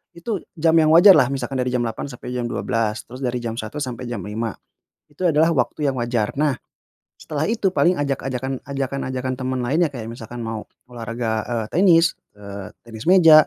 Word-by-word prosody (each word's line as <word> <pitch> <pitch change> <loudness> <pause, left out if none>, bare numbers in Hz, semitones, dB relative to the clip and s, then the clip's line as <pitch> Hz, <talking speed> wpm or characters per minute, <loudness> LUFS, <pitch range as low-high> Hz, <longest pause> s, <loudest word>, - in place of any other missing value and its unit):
itu 195 +4 -3 0.2
jam 165 0 +3
yang 155 0 +5
wajarlah 175 -7 +8
misalkan 130 -1 -3
dari 125 - 0
jam 125 -1 +1
8.00 115 +4 -3
sampai 125 -2 -8
jam 125 -1 -2
12.00, 115 -2 -1
terus 125 +2 -11
dari 125 -2 -2
jam 115 0 -3
1 125 +7 -4
sampai 125 -1 -5
jam 120 -6 -4
5.00, 110 +2 -3 0.5
itu 145 +5 -8
adalah 160 +1 +4
waktu 130 +3 0
yang 130 - -6
wajar. 120 -3 0
Nah, 150 -3 +2 0.6
setelah 155 +1 -3
itu 220 -4 +1
paling 180 0 +4
ajak-ajakan 135 -2 -2
ajakan-ajakan 130 -2 -3
teman 130 -1 -2
lainnya 155 +8 +2
kayak 120 -5 -7
misalkan 120 +1 -8
mau 110 -1 -4 0.3
olahraga, 115 -2 -3
eee, 115 -3 -2
tenis, 170 -1 +5 0.2
eee, 100 -1 -8
tenis 110 -1 -9
meja, 165 -5 +8
130 Hz, 180 wpm, -22 LUFS, 115-150 Hz, 0.6 s, wajarlah